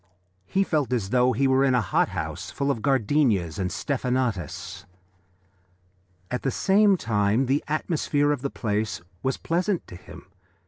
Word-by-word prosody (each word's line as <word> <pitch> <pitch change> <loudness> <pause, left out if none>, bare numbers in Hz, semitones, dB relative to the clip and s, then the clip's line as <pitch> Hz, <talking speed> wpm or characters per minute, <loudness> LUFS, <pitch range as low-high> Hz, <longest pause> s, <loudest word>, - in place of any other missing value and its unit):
He 195 - +2
felt 150 -8 -1
as 105 -5 -1
though 125 0 +4
he 135 +3 +1
were 135 0 +3
in 130 -2 +3
a - - +4
hot 105 - +1
house - - -5
full 140 0 -1
of 115 - -3
gardenias 115 - +1
and 90 -1 -1
stephanotis. 125 - -2 1.5
At 125 - -2
the 135 - 0
same 200 +6 +3
time 105 0 +1
the 135 +3 +1
atmosphere 150 -1 0
of 145 -3 -1
the 140 - -2
place 105 -7 -2 0.2
was 130 0 -1
pleasant 180 +2 -1
to - - -11
him. 90 - -13
130 Hz, 155 wpm, -25 LUFS, 110-145 Hz, 1.5 s, though